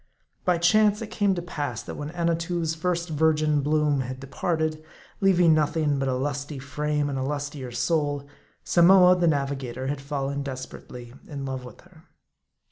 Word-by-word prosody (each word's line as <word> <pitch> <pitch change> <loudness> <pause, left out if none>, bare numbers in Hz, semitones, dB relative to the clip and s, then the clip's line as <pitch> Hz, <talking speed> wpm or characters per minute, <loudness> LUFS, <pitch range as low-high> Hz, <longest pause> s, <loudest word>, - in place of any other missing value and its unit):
By 180 -1 +3
chance 210 +4 +4
it 215 - -8
came 200 -2 +1
to 175 - -4
pass 145 - -4
that - - -7
when 145 0 -5
Annatoo' 170 0 -1
s 160 0 0
first 170 +1 -2
virgin 155 -1 +2
bloom 150 -1 +2
had 130 0 -5
departed, 155 +3 -2 0.4
leaving 180 -4 +5
nothing 150 -1 +1
but 135 - 0
a 130 - 0
lusty 140 +2 -3
frame 150 +2 -2
and 135 -2 -2
a - - -1
lustier 145 -2 -4
soul, 145 +3 0 0.4
Samoa, 180 +1 +6
the 175 -1 +2
Navigator, 135 -4 -1
had 140 +1 -3
fallen 140 0 -3
desper 130 -2 -7
ately 120 -1 -11 0.2
in 140 -3 -5
love 130 -1 -4
with 125 - -12
her. 175 -2 -20
150 Hz, 170 wpm, -25 LUFS, 140-170 Hz, 0.4 s, Samoa